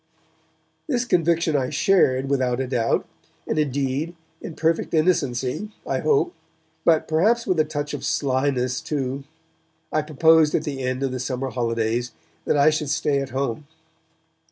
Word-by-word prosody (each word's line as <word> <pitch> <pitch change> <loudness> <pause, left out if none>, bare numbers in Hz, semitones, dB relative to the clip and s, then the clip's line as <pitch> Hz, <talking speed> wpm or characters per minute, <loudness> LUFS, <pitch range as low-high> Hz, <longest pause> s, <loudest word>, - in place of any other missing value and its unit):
This 250 -5 0
conviction 170 -6 +2
I 130 -2 +1
shared, 135 -9 +2
without 130 -3 0
a 135 - 0
doubt; 120 -3 0 0.4
and, 155 - -1
indeed, 140 +3 -1 0.3
in 160 - -7
perfect 165 0 0
innocency, 155 - 0 0.2
I - - -1
hope, 415 -5 +2 0.5
but 160 -2 +3
perhaps 215 +10 +2
with 180 -3 0
a 155 - +4
touch 150 -1 -4
of - - -5
slyness 130 -2 0
too, 135 -2 -3 0.7
I 155 - +1
proposed 155 +1 +4
at 155 - 0
the 140 -3 -4
end 130 +1 -2
of 135 - 0
the 130 - -4
summer 130 +1 -3
holidays 115 0 -1 0.3
that - - +2
I 145 +2 +5
should 150 -2 -2
stay 145 -1 +1
at 135 - -5
home. 135 +1 -3
140 Hz, 155 wpm, -23 LUFS, 130-160 Hz, 0.7 s, I